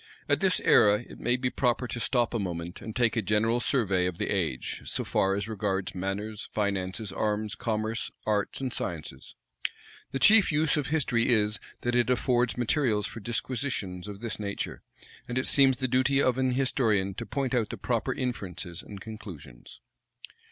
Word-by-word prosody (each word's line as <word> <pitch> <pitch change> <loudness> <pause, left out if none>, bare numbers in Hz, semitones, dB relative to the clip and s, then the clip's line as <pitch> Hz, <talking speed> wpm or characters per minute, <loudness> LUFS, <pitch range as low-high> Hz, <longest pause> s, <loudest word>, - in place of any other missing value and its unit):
At - - +2
this 190 -2 +2
era, 105 +1 +5
it - - -12
may 120 +1 +1
be 125 0 -1
proper 125 0 +1
to 120 - -4
stop 120 +1 +1
a 115 - 0
moment, 85 -2 -4
and 110 +1 -7
take 120 -2 +2
a 115 - +2
general 110 +4 +2
survey 100 -7 +1
of 90 -2 -4
the - - -2
age, 65 - -2
so - - -2
far 95 0 +1
as 100 +1 -2
regards 100 -3 -2
manners, 100 +3 -4
finances, 100 0 -1
arms, 105 +1 -1
commerce, 110 +1 -2 0.2
arts, 105 -2 0
and 130 -2 -2
sciences. 75 -7 -4 0.8
The - - -1
chief 205 +9 +6
use 150 +1 +2
of 150 -3 -1
history 135 -7 +2
is, 105 -3 +4 0.2
that 120 - -1
it 120 -1 +3
affords 125 -1 +2
materials 120 -4 +1
for 115 - -6
disquisitions 115 -5 -2
of 100 0 -8
this 115 -2 -4
nature; 100 -1 -4 0.5
and 120 - -3
it 130 - +1
seems 135 -2 +5
the 130 - 0
duty 130 +2 +2
of 130 -2 +2
an 130 -1 +2
historian 115 -7 +1
to - - -6
point 135 -2 -1
out 115 -4 +1
the - - -5
proper - - -1
inferences 90 -8 -4
and 100 - -10
conclusions. 95 - -10
110 Hz, 180 wpm, -28 LUFS, 100-125 Hz, 0.8 s, chief